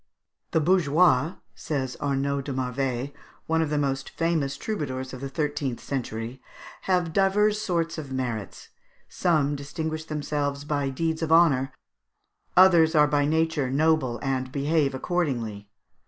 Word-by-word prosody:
] - - -53
"The 160 - +4
bourgeois," 160 -2 +3 0.2
says 135 -4 -3
Arnaud 140 0 0
de 140 - -3
Marveil, 130 +1 -2 0.3
one 160 0 +1
of 160 - 0
the 150 - 0
most 135 -2 -1
famous 160 -5 -1
troubadours 130 -11 -4
of 130 - -7
the 135 - -4
thirteenth 145 -3 -2
century, 120 -1 -5 0.5
"have 180 -3 +1
divers 205 +2 +3
sorts 170 -5 -1
of 140 -4 -8
merits: 120 -6 -4 0.4
some 150 -5 +1
distinguish 155 +3 -4
themselves 145 -2 -2
by 145 -2 -1
deeds 160 +4 -2
of 160 -1 -1
honour, 150 -6 +4 0.9
others 170 -3 +6
are 150 -1 +6
by 145 -1 +2
nature 160 -3 +1
noble 140 -3 +1
and 130 -1 -1
behave 145 0 +1
accordingly. 120 - -2
145 Hz, 140 wpm, -26 LUFS, 135-160 Hz, 0.9 s, others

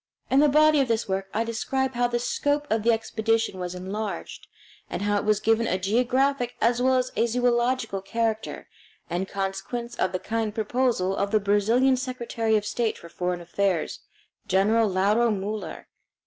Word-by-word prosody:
In 270 - +5
the 295 0 +5
body 305 +1 +5
of 270 - +2
this 230 -1 0
work 195 0 -2
I 225 - 0
describe 265 +3 -2
how 245 0 +1
the 240 0 -1
scope 290 +4 0
of 220 0 +2
the 230 +2 +3
expedition 225 -2 0
was 180 0 -4
enlarged, 200 +4 -5 0.4
and - - -3
how 205 0 +1
it 205 - -2
was 210 -1 +3
given 225 +2 +2
a 185 - +1
geographic 245 +5 +1
as 235 +2 +2
well 260 +1 +3
as 255 0 0
a 235 - +2
zoological 240 -3 +1
character, 220 +2 -2 0.4
in 180 +2 -1
consequence 195 +5 -4
of 185 - +1
the 185 - -1
kind 220 +2 -3
proposal 220 -4 0
of 200 0 -1
the 215 +1 +3
Brazilian 220 +6 +3
Secretary 235 -3 -1
of 210 - -3
State 225 +1 -1
for 170 - -12
Foreign 180 +1 -3
Affairs, 175 0 -1 0.5
General 210 +3 +3
Lauro 205 +5 +2
Muller. 210 +1 -4
225 Hz, 175 wpm, -25 LUFS, 200-245 Hz, 0.5 s, In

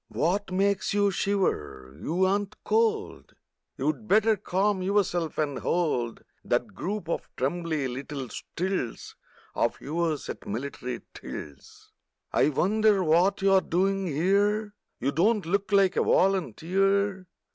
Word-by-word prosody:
What 190 +4 0
makes 195 +1 +1
you 205 -1 +3
shiver? 75 - -1
You 180 +4 +1
ain't 200 +2 -1
cold! 440 -1 0 0.4
You'd 265 -8 -2
better 215 +2 +4
calm 195 0 0
yourself 185 -4 0
and 145 -3 -1
hold 130 -10 -1 0.2
That - - -1
group 200 -2 -4
of 170 - -3
trembly 155 0 -1
little 135 +1 -5
stilts 180 -7 -4 0.4
Of - - 0
yours 160 0 -2
at - - -7
military 125 +2 -4
tilts! 70 -2 -10 0.4
I - - +4
wonder 205 +5 +3
what 180 +5 +3
you're 195 -1 +5
doin' 195 +2 0
here? 200 +7 +1 0.3
You 135 +3 0
don't 205 +5 +2
look 195 +3 -1
like 195 -2 +4
a - - +3
volunteer! 195 - +1
190 Hz, 125 wpm, -27 LUFS, 155-200 Hz, 0.4 s, you're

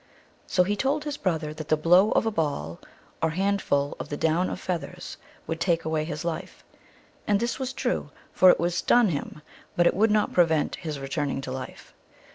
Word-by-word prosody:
So 180 - +3
he 205 +3 -1
told 280 +7 0
his 295 -1 -3
brother 160 - -2
that 155 0 -8
the 155 - +2
blow 180 +6 +5
of - - +2
a 225 - +1
ball, 140 - -2 0.4
or 160 - +2
handful 175 -6 0
of - - -6
the 145 - -4
down 165 +4 +1
of - - -5
feath 180 -3 -2
ers, 180 -1 -9 0.3
would 165 0 -4
take 170 -3 +1
away 160 -1 -1
his 155 +1 -5
life; 165 -2 -5 0.6
and 205 -1 +3
this 235 +3 -2
was 260 -1 -2
true, 250 - -2 0.2
for 185 - +6
it - - +5
would 175 +1 0
stun 235 +5 +3
him, 150 -1 -5 0.3
but 175 - +3
it - - +4
would 220 +4 +3
not 210 0 +1
prevent 160 -4 +2
his 155 -4 -5
re 135 - -6
turning 145 -1 -2
to 130 - -6
life. 130 -1 -8
170 Hz, 210 wpm, -26 LUFS, 155-200 Hz, 0.6 s, for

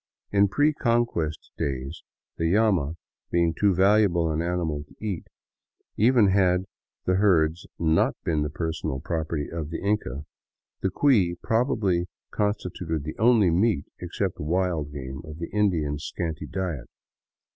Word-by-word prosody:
In 100 0 +4
pre 145 +10 +2
Conquest 115 - 0
days 70 +3 -3 0.2
— - - -61
the 80 0 +1
llama 95 -8 +2 0.3
being 85 -1 +2
too 100 +2 +2
valuable 95 -4 +4
an 80 +1 -1
animal 85 -4 -1
to - - -21
eat, 100 -6 -4 0.7
even 115 -2 +5
had 95 -1 +3 0.4
the 90 0 +2
herds 85 -4 +2
not 80 -1 +2
been 80 -3 0
the 75 - -1
personal 80 -3 -3
property 80 -1 -2
of 80 -3 -5
the 85 - -4
Inca 95 - -1 0.3
— - - -61
the 95 - +1
cui 95 -6 +3
probably 105 -7 +1 0.2
constituted 90 -6 -2
the 75 +1 -5
only 110 -5 +5
meat, 90 -3 +2
except - - -3
wild 85 -2 0
game, 65 0 -6
of 75 -1 -9
the 85 0 -6
Indian's 80 -9 0
scanty 80 -3 -4
diet. 85 -9 -3
85 Hz, 145 wpm, -26 LUFS, 80-100 Hz, 0.7 s, even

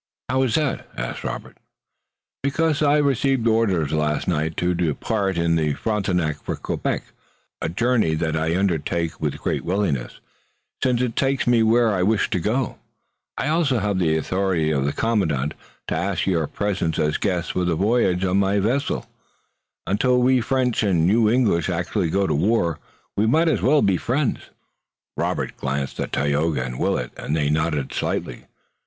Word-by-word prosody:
"How 130 +1 +2
is 130 -4 +1
that?" 150 -4 -1
asked - - -4
Robert - - -6 0.8
"Because 155 +2 0
I 145 0 +4
received 135 -3 +1
orders 100 -10 +2
last 75 -1 0
night 80 -2 -1
to 90 0 +1
depart 95 - -1
in 85 0 +2
the 75 -2 +1
Frontenac 90 -8 -1
for - - -3
Quebec, - - -2 0.6
a - - -1
journey 110 -3 +1
that 80 0 -1
I 80 +2 0
undertake 85 -3 -1
with - - -1
great - - -2
willingness, 90 -9 -1 0.6
since 125 -1 +2
it 120 -3 -2
takes 135 -1 +1
me 120 -2 +4
where 115 0 +3
I 90 - 0
wish 105 +3 +1
to 95 - +1
go. 110 +7 -1 0.6
I - - -1
have 150 - +1
also 125 - +1
the 85 -4 +1
authority 90 -1 0
of 70 -3 0
the 70 - +1
commandant 80 - 0 0.4
to - - -1
ask 100 +1 -1
your 85 -5 +1
presence 95 -5 -2
as 75 0 +1
guests 90 -4 -1
for 90 - -1
the 85 -2 +1
voyage 95 -2 +2
on 95 +1 +2
board 100 0 +2
my - - +3
vessel. 120 +8 0 0.8
Until 125 +6 +2
we 125 0 +3
French 125 0 0
and 90 -6 +2
you 110 +2 +4
English 110 -9 +2
actually 85 - -1
go 100 +4 +1
to - - 0
war 85 -1 +1 0.4
we 105 +2 +2
might 160 +8 +3
as - - 0
well 145 +1 +4
be 95 -2 +3
friends." 130 +6 -1 0.7
Robert - - -2
glanced 70 0 -3
at - - -3
Tayoga 75 0 0
and 60 0 -6
Willet 60 - -1
and 75 - -2
they 75 -2 +1
nodded 75 -3 -1
slightly. - - -3
95 Hz, 170 wpm, -22 LUFS, 80-120 Hz, 0.8 s, I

